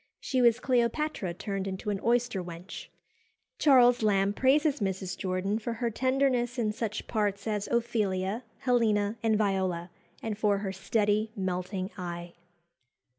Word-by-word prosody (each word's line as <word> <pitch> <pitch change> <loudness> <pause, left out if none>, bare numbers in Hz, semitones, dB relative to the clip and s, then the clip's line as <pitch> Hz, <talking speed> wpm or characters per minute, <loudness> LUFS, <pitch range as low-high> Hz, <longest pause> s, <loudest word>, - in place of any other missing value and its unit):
She 260 -2 0
was 235 -1 +5
Cleopatra 245 - 0
turned 195 0 -3
into 190 +2 -3
an 200 - -2
oyster 235 -5 +1
wench." 175 +3 -8 0.7
Charles 245 -4 +6
Lamb 200 -2 +2
praises 285 +5 +3
Mrs. 190 -2 -2
Jordan 190 +3 -1
for 230 +1 -3
her 235 0 -2
tenderness 255 0 +1
in 220 -3 +1
such 215 -1 -4
parts 205 -2 -1
as 210 -2 -1
Ophelia, 220 -2 0 0.2
Helena, 220 -4 +2
and 220 -2 +2
Viola, 190 -4 0 0.3
and 220 -2 -2
for 205 -2 +3
her 195 -1 -3
"steady, 210 +2 +1
melting 185 0 -3
eye." 175 -1 -6
210 Hz, 135 wpm, -29 LUFS, 190-235 Hz, 0.7 s, Charles